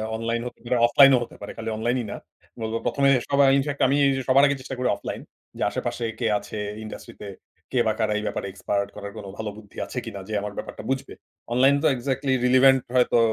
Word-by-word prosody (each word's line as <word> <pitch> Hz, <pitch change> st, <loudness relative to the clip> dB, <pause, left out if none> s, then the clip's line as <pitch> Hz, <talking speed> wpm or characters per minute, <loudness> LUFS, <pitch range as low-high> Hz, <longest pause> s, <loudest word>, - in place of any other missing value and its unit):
Online 115 Hz, +1 st, -2 dB
হতে -, -, -11 dB
পারে, 125 Hz, +1 st, +1 dB
offline 135 Hz, +3 st, +7 dB
ও -, -, +4 dB
হতে -, -, -12 dB
পারে, 100 Hz, -, -6 dB
খালি 115 Hz, 0 st, -4 dB
অনলাইন 120 Hz, +3 st, 0 dB
ই -, -, -6 dB
না। -, -, -5 dB, 0.5 s
উব 110 Hz, 0 st, -3 dB
প্রথমে 140 Hz, +3 st, +2 dB, 0.2 s
সবাই 140 Hz, 0 st, +5 dB
ইনফ্যাক্ট, 140 Hz, +1 st, -2 dB
আমি 140 Hz, -, +2 dB, 0.3 s
সবার 135 Hz, +2 st, +5 dB
আগে 140 Hz, -1 st, +1 dB
চেষ্টা 130 Hz, 0 st, -6 dB
করি 125 Hz, -, 0 dB
অফলাইন। -, -, -6 dB, 0.4 s
যে -, -, -1 dB
আশেপাশে 120 Hz, -, -3 dB
কে 115 Hz, -, 0 dB
আছে 110 Hz, -, -8 dB, 0.3 s
ইন্ডাস্ট্রি 110 Hz, -, -9 dB
তে, 105 Hz, -, -6 dB, 0.4 s
কে 125 Hz, -, +1 dB
বা 110 Hz, -, +2 dB
কারা 110 Hz, -1 st, +1 dB
এই 105 Hz, -, -3 dB
ব্যাপারে -, -, -3 dB
এক্সপার্ট? 100 Hz, +1 st, -2 dB
করার 100 Hz, -1 st, -7 dB
কোন 105 Hz, -, -8 dB
ভালো 110 Hz, -1 st, -3 dB
বুদ্ধি 105 Hz, -2 st, -15 dB
আছে -, -, -9 dB
কিনা 105 Hz, -3 st, -6 dB
যে -, -, -4 dB
আমার 105 Hz, 0 st, -5 dB
ব্যাপারটা -, -, -7 dB
বুঝবে? 135 Hz, +1 st, -2 dB, 0.4 s
অনলাইন 135 Hz, +3 st, +5 dB
তো -, -, +5 dB
এক্সাক্টলি 135 Hz, +2 st, -1 dB
রিলিভেন্ট 130 Hz, +1 st, +6 dB
হয়তো 125 Hz, -1 st, +4 dB
120 Hz, 215 wpm, -24 LUFS, 110-135 Hz, 0.5 s, অফলাইন